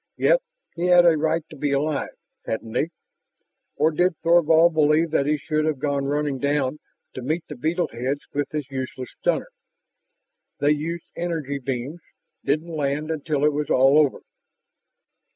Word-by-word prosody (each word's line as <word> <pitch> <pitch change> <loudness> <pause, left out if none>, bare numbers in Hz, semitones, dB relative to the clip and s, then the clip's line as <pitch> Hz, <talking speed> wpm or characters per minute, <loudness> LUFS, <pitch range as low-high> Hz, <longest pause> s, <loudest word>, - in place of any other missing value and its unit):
Yet - - +4 0.3
he 175 +1 -1
had 175 -1 +6
a 170 -2 +6
right 160 +1 0
to - - -9
be 145 0 -1
alive, 145 +1 0 0.4
hadn't 110 0 -4
he? 160 - 0 0.9
Or 155 +2 +3
did 175 +1 +1
Thorvald 170 0 +4
believe 155 +1 +3
that 140 -2 +1
he 150 0 +2
should 155 +1 -1
have 155 -2 0
gone 140 0 -1
running 145 -1 -1
down 140 0 0 0.3
to 130 - -6
meet 155 +7 -2
the 150 - -7
beetle 160 +7 0
heads 130 +5 -2
with 145 0 -1
his 150 -3 -5
useless 130 -1 -5
stunner? - - -1 1.1
"They 145 +1 +3
used 160 +3 -2
energy 160 -5 -3
beams... 135 +5 -4 0.4
didn't 155 +4 -1
land 150 +1 -1
until 150 -2 -1
it 150 - +3
was 150 0 -2
all 135 +3 +5
over." 145 -3 +2
150 Hz, 160 wpm, -23 LUFS, 140-160 Hz, 1.1 s, had